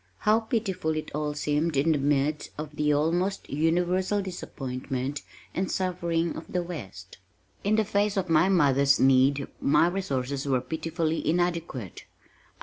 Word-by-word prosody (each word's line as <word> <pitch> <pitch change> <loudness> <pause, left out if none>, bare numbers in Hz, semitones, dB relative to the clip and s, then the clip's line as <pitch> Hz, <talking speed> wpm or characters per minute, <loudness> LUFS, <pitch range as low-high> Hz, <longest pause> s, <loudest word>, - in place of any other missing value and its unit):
How 215 +1 +4
pitiful 215 -8 -1
it 155 - -4
all 150 0 -2
seemed 150 +1 0
in 150 +4 +3
the 150 - +2
midst 145 +1 0
of 150 0 -6
the 150 0 +1
almost 170 +6 0
universal 180 +6 +1
disappointment 135 -6 -4 0.3
and 185 +1 -1
suffering 170 -3 -1
of 160 - -9
the 180 -1 0
West! 95 - -9 0.4
In 205 +2 +2
the 220 0 +2
face 205 0 0
of 185 -1 0
my 165 +3 +4
mother's 140 -6 +4
need 135 +1 +4
my 150 +4 +4
resources 140 -7 -2
were 130 -2 +2
pitifully 160 +3 -2
inadequate. 170 - -2
160 Hz, 145 wpm, -27 LUFS, 140-180 Hz, 0.4 s, How